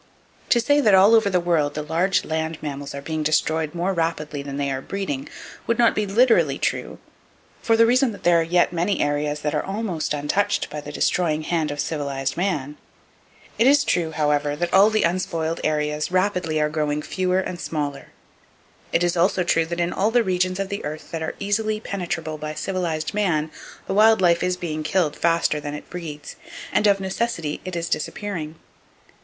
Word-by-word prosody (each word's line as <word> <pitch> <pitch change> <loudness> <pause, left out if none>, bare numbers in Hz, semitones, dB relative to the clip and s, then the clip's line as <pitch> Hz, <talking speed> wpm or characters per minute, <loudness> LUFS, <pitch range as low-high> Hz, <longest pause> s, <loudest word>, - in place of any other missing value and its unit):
To 240 - +4
say 290 +5 +3
that 210 -7 +5
all 195 +4 +6
over 220 -3 +5
the 185 -2 +2
world, 165 -4 +1
the 150 - -3
large 170 +6 +1
land 160 0 -2
mammals 140 -1 -5
are 140 - -6
being 155 +1 -3
destroyed 155 +1 0
more 180 +3 0
rapidly 165 -4 -2
than 140 0 -6
they 140 -1 -1
are 135 0 -3
breeding, 145 -7 -4 0.4
would 230 - +1
not 235 -1 +4
be 210 -1 -1
literally 230 +4 +3
true, - - -2 0.6
for 225 -1 +2
the 230 - +6
reason 250 +1 +3
that 200 - -11
there 175 -1 +5
are - - +2
yet 175 +2 +2
many 175 +4 0
areas 145 0 -1
that 150 0 -1
are 150 - +1
almost 195 -7 -3
untouched 200 +8 0
by 150 - -5
the 145 - -8
destroying 155 0 0
hand 160 -1 -1
of 145 0 -5
civilized 140 -4 -2
man. 150 -6 -2 0.8
It 235 - +5
is 280 +1 +5
true, 170 -3 0
however, 150 -2 0
that 170 +3 -3
all 195 +3 +7
the 215 0 +1
unspoiled 170 -2 -1
areas 150 +1 -1
rapidly 180 -4 0
are 150 - +2
growing 150 -1 -1
fewer 185 -1 0
and 185 -2 -3
smaller. 145 -4 -4 0.8
It 170 - +2
is 175 0 +1
also 180 +1 +2
true 165 -2 +1
that 170 +1 -4
in 170 0 0
all 200 +3 +1
the 240 +1 +3
regions 185 -1 0
of 195 -1 -2
the 200 - -4
earth 155 +1 -6
that 165 - -4
are 160 - -3
easily 215 +2 -1
penetrable 170 -6 -4
by 155 0 -5
civilized 170 -5 -2
man, 165 -7 0 0.3
the - - -3
wild 220 +2 +5
life 170 -2 +3
is 180 0 0
being 155 -3 -4
killed 155 -1 0
faster 165 -2 +1
than 145 0 -5
it 150 - -10
breeds, 155 -4 -7 0.4
and 210 - +3
of 200 -1 +4
necessity 190 -5 -2
it 185 -1 -6
is 170 0 -2
disappearing. 165 -2 -3
170 Hz, 195 wpm, -23 LUFS, 150-195 Hz, 0.8 s, all